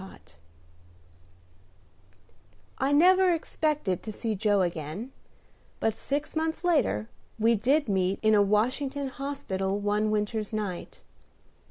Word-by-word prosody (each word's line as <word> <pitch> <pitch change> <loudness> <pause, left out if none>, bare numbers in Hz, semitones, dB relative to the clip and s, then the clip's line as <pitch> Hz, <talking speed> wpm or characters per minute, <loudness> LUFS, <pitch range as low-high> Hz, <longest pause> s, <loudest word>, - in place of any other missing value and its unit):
II 190 - -9 2.7
I 270 +2 +1
never 370 +5 +5
expected 305 - -1
to 220 - -6
see 220 +1 -3
Joe 205 -1 +2
again; 170 - -4 0.7
but, 225 -1 0
six 285 +6 -3
months 320 +2 -1
later, 290 - +1 0.3
we 225 +1 +3
did 265 +7 +2
meet 190 -1 +1
in 215 0 +4
a 205 - +6
Washington 255 +7 0
hospital 250 -9 -3
one 205 +1 0
winter's 215 0 -1
night. 205 -5 -5
220 Hz, 115 wpm, -27 LUFS, 200-285 Hz, 2.7 s, a